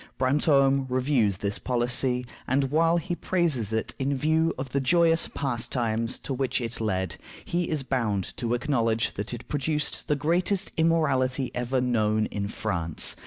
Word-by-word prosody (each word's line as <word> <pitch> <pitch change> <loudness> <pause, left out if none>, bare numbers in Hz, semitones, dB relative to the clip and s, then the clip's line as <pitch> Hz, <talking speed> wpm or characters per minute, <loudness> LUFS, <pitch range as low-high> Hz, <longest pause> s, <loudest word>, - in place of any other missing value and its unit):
Brantome 135 0 +3
reviews 125 -6 +1
this 100 +1 -3
policy, 125 0 0 0.2
and 135 +1 +1
while 165 +2 +3
he 175 +1 -3
praises 165 - 0
it 110 0 -2
in 135 +1 0
view 160 +4 +2
of 130 0 -4
the 140 +2 0
"joyous 165 +3 +3
pastimes" 115 -3 -1
to 135 - -3
which 130 0 0
it 115 -1 -4
led, 95 -4 -1 0.3
he 175 0 -1
is 155 -4 -1
bound 115 -8 -1
to 120 -1 0
acknowledge 115 -4 0
that 100 +1 -5
it 120 -1 -7
produced 150 +1 -2
the 150 - +2
greatest 175 +6 +1
immorality 140 -6 +1
ever 125 +2 -1
known 110 -3 +1
in 100 -1 -2
France. 85 -7 -1
130 Hz, 155 wpm, -26 LUFS, 115-150 Hz, 0.3 s, Brantome